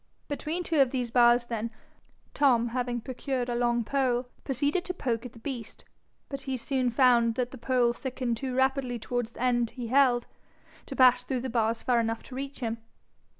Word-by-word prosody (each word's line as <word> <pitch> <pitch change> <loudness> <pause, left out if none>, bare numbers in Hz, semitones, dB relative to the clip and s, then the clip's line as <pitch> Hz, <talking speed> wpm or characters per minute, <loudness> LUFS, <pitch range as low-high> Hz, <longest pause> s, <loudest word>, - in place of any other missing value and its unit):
Between 310 +4 -3
two 325 -3 0
of 265 - +4
these 245 -2 -2
bars, 240 0 +5
then, 230 -1 -3 0.6
Tom, 245 -5 +3
having 245 0 -2
procured 255 0 -3
a - - 0
long 240 0 +1
pole, 255 0 0 0.2
proceeded 285 +6 0
to 360 - -4
poke 245 -5 -2
at 235 - -17
the - - -14
beast; 230 -2 -7 0.4
but 275 -1 -5
he 265 -1 -3
soon 255 +1 0
found 235 -2 +4
that 250 0 -1
the 265 - -9
pole 240 0 +2
thickened 250 -2 -3
too 260 0 -4
rapidly 265 -1 +1
towards 240 0 -3
the 240 - -7
end 240 -2 +2
he 235 -1 -6
held, 255 -2 +4 0.6
to 270 - -6
pass 250 -1 +6
through 250 -1 -2
the 260 -1 -4
bars 225 -1 0
far 245 -2 +3
enough 225 0 -1
to - - -12
reach 275 +1 -6
him. 230 -1 -2
250 Hz, 195 wpm, -28 LUFS, 235-265 Hz, 0.6 s, pass